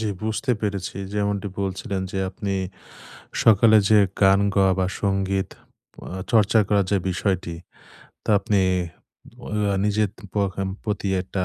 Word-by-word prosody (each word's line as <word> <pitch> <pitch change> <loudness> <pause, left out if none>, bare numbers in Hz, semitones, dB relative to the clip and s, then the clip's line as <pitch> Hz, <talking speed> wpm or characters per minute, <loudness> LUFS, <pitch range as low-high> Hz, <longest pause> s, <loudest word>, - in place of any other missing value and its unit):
জ্বি, 110 -2 -1
বুঝতে 110 +4 -1
পেরেছি। 100 -3 -3 0.2
যেমনটি 100 -1 -1
বলছিলেন, 95 +1 -3
যে 95 - -3
আপনি 100 0 -3 0.9
সকালে 110 0 +6
যে 105 -1 +6 0.2
গান 95 0 +6
গাওয়া 95 -1 +4
বা 90 - +1
সংগীত 95 -1 0 0.6
আ - - -6 0.2
চর্চা 110 0 +4
করার 100 -2 +2
যে 100 - +4
বিষয়টি। 90 -2 -1 0.7
তা - - -1
আপনি 100 0 +1 0.8
ওয়া 105 -2 -1
নিজের 105 -1 +1 0.2
পখাম 95 -1 -1 0.2
প্রতি 105 -2 -2
একটা 95 0 -3
100 Hz, 130 wpm, -23 LUFS, 95-105 Hz, 0.9 s, সকালে